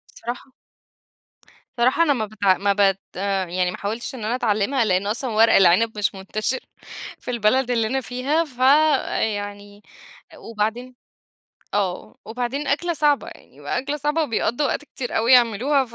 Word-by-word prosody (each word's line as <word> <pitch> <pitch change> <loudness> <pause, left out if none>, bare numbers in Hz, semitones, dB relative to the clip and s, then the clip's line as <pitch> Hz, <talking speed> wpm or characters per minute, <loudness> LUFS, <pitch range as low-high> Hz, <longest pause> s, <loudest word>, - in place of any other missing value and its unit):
صراحة 240 +3 -7 1.3
صراحة 255 +7 +3
أنا 295 -3 +3
ما 225 -5 -2
بت 210 -1 -12
ما 200 +1 +3
بت 195 -1 +2 0.5
يعني 180 0 0
ما - - -7
حاولتش 225 +6 -4
إن 230 - -8
أنا 230 +3 0
أتعلِّمها 230 +1 +1
لإن 190 0 +1
أصلًا 240 +5 -1
ورق 220 +1 +4
العنب 195 +4 +4
مش 200 -1 0
منتشرّ 215 +6 -3 0.6
في - - -6
البلد 240 +3 +1
اللي 225 -2 +1
أنا 265 +3 -1
فيها، 270 +7 -1
فيعني 220 -7 0 0.6
وبعدين 230 +3 -4 0.8
آه، 190 -3 -2
وبعدين 250 +5 -4
أكلة 340 +5 0
صعبة 295 -2 +1
يعني، - - -15
يبقى - - -3
أكلة 285 +3 -3
صعبة 300 +3 0
وبيقضّوا 245 +1 0
وقت 295 - -2
كتير 255 -4 -5
أوي 230 +3 +3
يعملوها 250 +4 +4
ف 235 -1 -15
235 Hz, 150 wpm, -22 LUFS, 205-265 Hz, 1.3 s, ورق